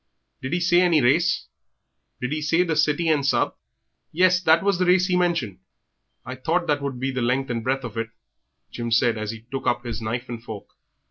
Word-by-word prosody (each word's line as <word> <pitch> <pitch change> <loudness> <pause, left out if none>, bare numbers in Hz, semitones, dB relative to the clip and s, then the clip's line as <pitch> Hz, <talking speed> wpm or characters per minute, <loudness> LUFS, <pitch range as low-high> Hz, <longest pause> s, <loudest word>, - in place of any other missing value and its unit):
"Did 130 +4 -4
he 175 - +1
say 175 0 +3
any 175 -4 +4
race? 150 +7 +2 0.8
Did 125 +1 -3
he 155 0 -2
say 165 +4 +2
the 165 -3 -1
City 155 +2 +1
and 150 -3 +2
Sub.?" 140 - +1 0.6
"Yes, 180 +2 +3
that 165 0 +4
was 200 -2 +1
the 185 - +2
race 180 0 +4
he 185 -1 0
mentioned." 170 - 0 0.7
"I 130 - -5
thought 165 +7 -1
that 145 -3 0
would 140 -3 -4
be 135 +1 -1
about - - -10
the 120 - 0
length 130 +1 0
and 115 - -1
the - - -13
breadth 135 +1 0
of 115 -2 -7
it," 115 0 -2 0.6
Jim 120 -1 -4
said, 120 0 +3
as 110 -1 -4
he 115 0 -7
took 135 -1 -4
up 120 0 0
his 115 -2 -5
knife 120 +3 -3
and 115 -1 -7
fork. 110 -4 -9
135 Hz, 225 wpm, -23 LUFS, 120-170 Hz, 0.8 s, any